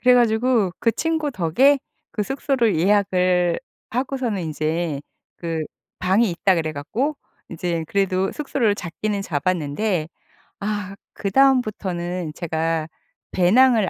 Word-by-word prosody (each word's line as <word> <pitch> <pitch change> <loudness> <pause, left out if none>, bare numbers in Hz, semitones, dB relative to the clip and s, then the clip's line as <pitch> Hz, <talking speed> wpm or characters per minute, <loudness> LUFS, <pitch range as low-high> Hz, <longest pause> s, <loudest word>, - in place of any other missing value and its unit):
그래 250 0 +6
가지고 230 -4 +3
그 230 - +3
친구 315 +1 -1
덕에 250 - +3 0.3
그 210 - -2
숙소를 265 - +1
예약을 180 -2 +2 0.3
하고서는 250 -5 -1
인제 155 -1 -2 0.4
그 165 -2 -3 0.4
방이 190 +3 +3
있다 180 +2 +2
그래 155 -1 -1
갖고 245 - -2 0.3
이제 170 -1 -2
그래도 190 0 +1
숙소를 270 -8 0
잡기는 200 +3 -3
잡았는데 165 +2 -1 0.5
아 205 -2 -3 0.2
그다음부터는 195 - +1
제가 160 -1 -1 0.4
배낭을 220 +3 +4
195 Hz, 255 characters per minute, -22 LUFS, 170-235 Hz, 0.5 s, 그래